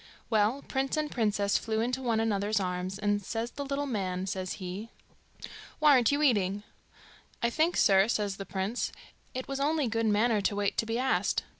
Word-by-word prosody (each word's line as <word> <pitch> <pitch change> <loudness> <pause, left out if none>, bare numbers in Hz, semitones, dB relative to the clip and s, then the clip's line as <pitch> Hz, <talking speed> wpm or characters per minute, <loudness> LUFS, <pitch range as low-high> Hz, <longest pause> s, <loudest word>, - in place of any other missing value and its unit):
Well, 220 +5 +2
prince 270 +2 -1
and 305 -1 -1
princess 205 -4 +1
flew 220 -1 -2
into 250 +3 -1
one 230 -3 +1
another's 210 -1 +1
arms, 180 0 -3
and 205 0 0
says 225 +4 -3
the 285 - -5
little 280 +1 -2
man, 190 -7 -2
says 185 -1 -3
he, 190 +4 -6 0.9
'Why 305 -1 +5
aren't 250 -3 +5
you 290 +1 +1
eating?' 205 -6 +2 0.8
'I 235 - +3
think, 320 +7 +1
sir,' 195 0 +5
says 205 -4 -1
the 195 - -6
prince, 195 +5 -2 0.4
'it 255 - -4
was 275 0 -3
only 295 -1 +1
good 225 0 0
manner 215 +1 +3
to 200 +1 0
wait 200 -1 0
to 225 - 0
be 225 +1 -1
asked. 260 +1 +1
220 Hz, 185 wpm, -29 LUFS, 200-260 Hz, 0.9 s, Why